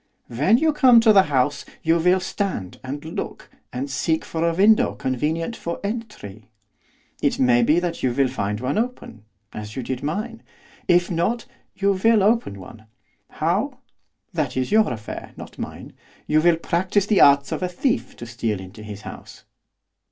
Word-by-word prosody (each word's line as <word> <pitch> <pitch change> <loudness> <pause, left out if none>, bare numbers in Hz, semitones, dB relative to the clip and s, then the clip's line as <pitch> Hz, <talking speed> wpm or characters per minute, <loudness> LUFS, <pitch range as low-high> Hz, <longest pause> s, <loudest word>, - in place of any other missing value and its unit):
'When 150 - +3
you 315 +3 +2
come 255 -5 +6
to 225 -2 +5
the 195 - +8
house, 135 +1 +1 0.2
you 165 +1 +3
will 180 +3 +3
stand, 185 - -4
and 140 +3 -6
look, 160 - -6 0.2
and 130 +3 -4
seek 160 +4 -1
for 165 0 -3
a 165 - -2
window 210 +4 +4
convenient 155 - -2
for 170 -5 -5
entry. 200 - -6 0.7
It - - +1
may 125 -2 +4
be 150 +8 +3
that 175 -1 -3
you 130 - +1
will 135 +2 +2
find 105 -5 -3
one 130 - -1
open, 225 - -5 0.3
as 105 0 -7
you 130 - -4
did 125 +1 -4
mine; 215 +10 -4 0.5
if 175 0 +3
not, 180 +8 -1 0.3
you 200 0 +2
will 215 +2 +3
open 210 - +1
one. 110 +4 -13 0.4
How, - - -1 0.6
that - - -2
is 130 +6 -1
your 215 0 +4
affair, 110 -3 -7
not - - -11
mine. - - -7 0.3
You 155 0 +3
will 170 0 +4
practise 185 +4 0
the 205 -2 +3
arts 140 0 +5
of - - -3
a 180 - -1
thief 235 +8 -1
to 120 - -9
steal 115 -3 -3
into 95 +3 -11
his 105 -1 -8
house. - - -11
160 Hz, 175 wpm, -22 LUFS, 125-200 Hz, 0.7 s, the